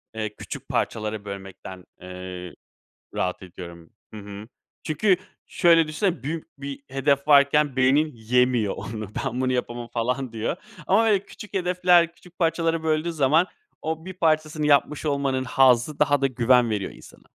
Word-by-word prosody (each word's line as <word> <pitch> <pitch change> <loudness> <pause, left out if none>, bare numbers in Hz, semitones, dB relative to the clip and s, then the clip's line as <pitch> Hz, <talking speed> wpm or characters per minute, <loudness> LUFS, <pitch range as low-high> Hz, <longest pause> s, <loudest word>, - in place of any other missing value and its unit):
eee, 110 -1 -4
küçük - - -8
parçalara 110 -1 -2
bölmekten, 95 -2 -9 0.2
eee, 90 -1 -8 0.6
rahat 90 0 -2
ediyorum. 85 -2 -11 0.2
Hı - - -7
hı. 100 +1 -9 0.3
Çünkü 180 +5 +2 0.3
şöyle 165 -3 +4
düşünsene, 165 - -1
büyük 160 +2 -6
bir 140 0 -6
hedef 140 +2 0
varken 140 -1 +5
beynin 135 +4 +3
yemiyor 120 -1 +1
onu 110 -2 -6 0.2
ben 125 -1 -2
bunu 130 0 +1
yapamam 120 -1 -3
falan 125 +2 -2
diyor 115 +7 -2 0.3
ama 210 +4 +4
böyle 205 -3 +2
küçük 210 - -12
hedefler, 180 -2 +3
küçük 180 +1 -20
parçalara 165 -1 +1
böldüğü 160 +1 0
zaman 155 +3 +3 0.4
o 160 +1 -3
bir 185 - -5
parçasını 155 -3 +1
yapmış 150 +1 +2
olmanın 140 -3 0
hazzı 130 +2 +3
daha 145 -1 +3
da 135 - +3
güven 125 -1 +3
veriyor 105 -3 -2
insana. - - -16
135 Hz, 150 wpm, -24 LUFS, 110-160 Hz, 0.6 s, varken